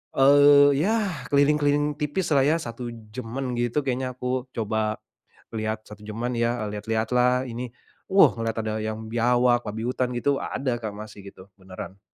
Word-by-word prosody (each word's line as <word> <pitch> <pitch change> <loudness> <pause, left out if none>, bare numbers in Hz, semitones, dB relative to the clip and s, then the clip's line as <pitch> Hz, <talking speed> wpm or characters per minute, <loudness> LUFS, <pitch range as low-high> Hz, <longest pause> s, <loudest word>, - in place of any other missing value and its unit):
eee, 145 +1 +7
ya 195 +10 +2 0.4
keliling-keliling 145 +1 +2
tipislah 150 -1 +1
ya, 155 - +3
1 120 -1 -6 0.3
jam-an 125 +2 -4
gitu 120 +4 0
kayaknya 130 -1 -2
aku 125 0 -2
coba 110 -1 -1 0.6
lihat 110 0 -2
1 105 0 -12
jam-an 115 +4 -3
ya, 120 +1 0
eee, 105 0 -5
lihat-lihat 110 +1 -2
lah 125 +1 +3
ini. 120 +1 -5 0.4
Wuh 190 - +6
ngelihat 115 -1 -3
ada 110 0 -2
yang 110 0 -4
biawak, 120 +1 +3
babi 110 +2 -4
hutan, 125 0 -1
gitu 140 +3 +1
ada 130 -3 -2
Kak, 110 -2 -4
masih 105 -1 -10
gitu, 95 -1 -13
beneran. 95 0 -10
120 Hz, 160 wpm, -25 LUFS, 110-140 Hz, 0.6 s, eee